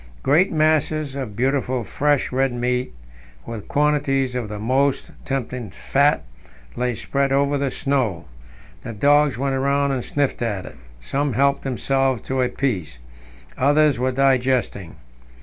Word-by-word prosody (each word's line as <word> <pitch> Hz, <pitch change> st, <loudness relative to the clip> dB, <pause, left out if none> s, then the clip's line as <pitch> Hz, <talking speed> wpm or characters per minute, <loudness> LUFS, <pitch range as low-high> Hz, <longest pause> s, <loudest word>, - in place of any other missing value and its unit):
Great 160 Hz, +8 st, +3 dB
masses 155 Hz, -2 st, +1 dB
of 130 Hz, -7 st, -5 dB
beautiful 130 Hz, 0 st, 0 dB
fresh, 145 Hz, +4 st, 0 dB
red 135 Hz, +1 st, +1 dB
meat, 125 Hz, +1 st, -1 dB, 0.5 s
with 115 Hz, -3 st, -7 dB
quantities 140 Hz, -3 st, +1 dB
of 120 Hz, -4 st, -3 dB
the 105 Hz, -, -5 dB
most 130 Hz, +6 st, 0 dB
tempting 125 Hz, -4 st, -3 dB
fat, 140 Hz, -, +1 dB, 0.5 s
lay 125 Hz, -1 st, -1 dB
spread 140 Hz, +4 st, -1 dB
over 140 Hz, +1 st, +2 dB
the 140 Hz, -1 st, 0 dB
snow. 130 Hz, -, -1 dB, 0.6 s
The 115 Hz, -, -7 dB
dogs 145 Hz, +3 st, +3 dB
went 135 Hz, +1 st, -1 dB
round 140 Hz, +1 st, +1 dB
and 125 Hz, -2 st, -2 dB
sniffed 145 Hz, -3 st, -1 dB
at 105 Hz, -6 st, -2 dB
it. -, -, -11 dB, 0.2 s
Some 140 Hz, -, -1 dB
helped 140 Hz, +4 st, +2 dB
themselves 135 Hz, -1 st, 0 dB
to 130 Hz, -1 st, -1 dB
a 125 Hz, -, +1 dB
piece; 95 Hz, -, -2 dB, 0.6 s
others 145 Hz, -1 st, +3 dB
were 130 Hz, +1 st, +1 dB
digesting. 130 Hz, -8 st, +1 dB
135 Hz, 140 wpm, -22 LUFS, 125-140 Hz, 0.6 s, Great